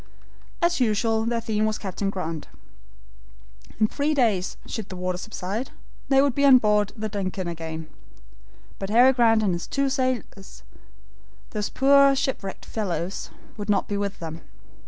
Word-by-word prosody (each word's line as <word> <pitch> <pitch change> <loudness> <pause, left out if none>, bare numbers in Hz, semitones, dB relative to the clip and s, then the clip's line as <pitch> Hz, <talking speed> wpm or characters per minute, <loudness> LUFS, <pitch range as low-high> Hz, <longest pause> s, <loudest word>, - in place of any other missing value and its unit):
As 345 -2 +2
usual 225 -1 +1
their 230 0 0
theme 215 -1 0
was 215 - -1
Captain 195 0 -3
Grant. 165 -5 -4 1.3
In 215 - +5
three 295 +6 -1
days, 215 -9 +1
should 220 -3 -5
the 185 - -6
water 180 0 -2
subside, 215 +3 -4 0.4
they 270 0 +5
would 280 -2 +2
be 280 - 0
on 270 -2 +8
board 210 -3 +2
the 215 -1 -3
DUNCAN 195 -2 -3
once 170 -1 -5
more. 160 0 -5 0.9
But 195 - -4
Harry 245 +5 +6
Grant 225 -3 +4
and 195 -4 +2
his 170 - -4
two 275 -1 0
sailors, 255 -7 -3 0.9
those 210 -2 -2
poor 275 0 +5
shipwrecked 235 -8 -3
fellows, 190 -3 -3 0.3
would 205 0 -6
not 200 -2 +2
be 205 - -2
with 200 0 -2
them. 165 -1 -7
215 Hz, 155 wpm, -25 LUFS, 190-250 Hz, 1.3 s, on